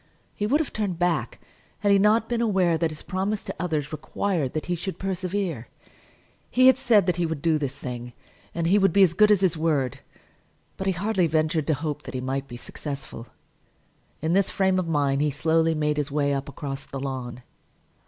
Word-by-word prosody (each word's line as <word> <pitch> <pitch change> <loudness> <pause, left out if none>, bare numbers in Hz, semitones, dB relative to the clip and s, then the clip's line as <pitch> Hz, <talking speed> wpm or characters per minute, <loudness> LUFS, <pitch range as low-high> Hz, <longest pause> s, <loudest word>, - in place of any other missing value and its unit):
He 210 - -2
would 285 +7 +3
have 315 - -3
turned 200 -5 -2
back 175 0 0 0.4
had 205 -1 +3
he 200 - +5
not 215 +3 +3
been 240 -1 -1
aware 190 -7 +2
that 165 0 0
his 155 -1 -9
promise 195 +3 -2
to - - -5
others 155 -4 -2
required 155 0 -2
that 155 - -3
he 175 - -1
should 180 +2 -4
persevere. 185 - -3 0.8
He 255 +1 +4
had 260 0 +7
said 220 -7 +4
that 180 -1 0
he 175 - +1
would 160 -2 -3
do 160 -2 +2
this 140 -2 -3
thing, 120 -3 -6 0.4
and 170 -1 -1
he 195 +5 +4
would 195 -4 +3
be 200 - +6
as 175 -3 +4
good 210 +4 +5
as 205 -3 +4
his 185 -4 +2
word. 150 -6 0 0.8
But 190 - -4
he 190 - +2
hardly 190 0 +1
ventured 155 -1 0
to 155 - +2
hope 150 +1 -4
that - - -8
he - - -1
might 135 +2 -3
be 120 - -8
successful. 135 -3 -7 1.0
In 160 +2 +1
this 195 0 +3
frame 190 -1 +1
of 180 - -2
mind 145 -3 +1
he 150 - +2
slowly 160 +3 +1
made 150 -1 0
his 150 0 -1
way 145 0 +1
up 140 +1 -3
across 135 0 -6
the 135 - -7
lawn. 130 -2 -5
165 Hz, 210 wpm, -25 LUFS, 140-190 Hz, 1.0 s, had